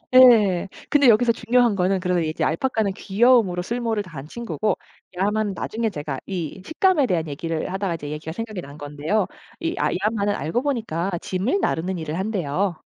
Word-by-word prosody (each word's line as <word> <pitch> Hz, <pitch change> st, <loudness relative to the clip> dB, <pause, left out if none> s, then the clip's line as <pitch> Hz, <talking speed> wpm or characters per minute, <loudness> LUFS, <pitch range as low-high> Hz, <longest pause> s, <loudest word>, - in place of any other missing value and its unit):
예. 215 Hz, -8 st, +7 dB, 0.2 s
근데 285 Hz, -2 st, +5 dB
여기서 235 Hz, +1 st, +5 dB
중요한 235 Hz, 0 st, +2 dB
거는 190 Hz, 0 st, +1 dB
그런 180 Hz, -2 st, 0 dB
이제 155 Hz, 0 st, -2 dB
알파카는 215 Hz, +3 st, 0 dB
귀여움으로 205 Hz, -2 st, +3 dB
쓸모를 230 Hz, +1 st, -1 dB
다한 160 Hz, -8 st, -8 dB
친구고 215 Hz, 0 st, -2 dB, 0.4 s
야마는 205 Hz, +2 st, 0 dB
나중에 220 Hz, +3 st, -2 dB
제가 145 Hz, -5 st, -4 dB
이 185 Hz, -1 st, -5 dB
식감에 320 Hz, -2 st, +3 dB
대한 170 Hz, -8 st, 0 dB
얘기를 160 Hz, +4 st, -3 dB
하다가 190 Hz, -1 st, -1 dB
이제 150 Hz, -3 st, -6 dB
얘기가 150 Hz, +1 st, -5 dB
생각이 215 Hz, 0 st, -5 dB
난 140 Hz, 0 st, -11 dB
건데요. 150 Hz, +8 st, -1 dB, 0.3 s
이 335 Hz, 0 st, -2 dB
아 -, -, +1 dB
이 -, -, 0 dB
야마는 205 Hz, -1 st, +1 dB
알고 165 Hz, -, -1 dB
보니까 215 Hz, -, -1 dB
짐을 195 Hz, -, 0 dB
나르는 180 Hz, +2 st, -1 dB
일을 160 Hz, 0 st, -4 dB
한대요. 190 Hz, -3 st, -1 dB
195 Hz, 395 characters per minute, -23 LUFS, 165-225 Hz, 0.4 s, 예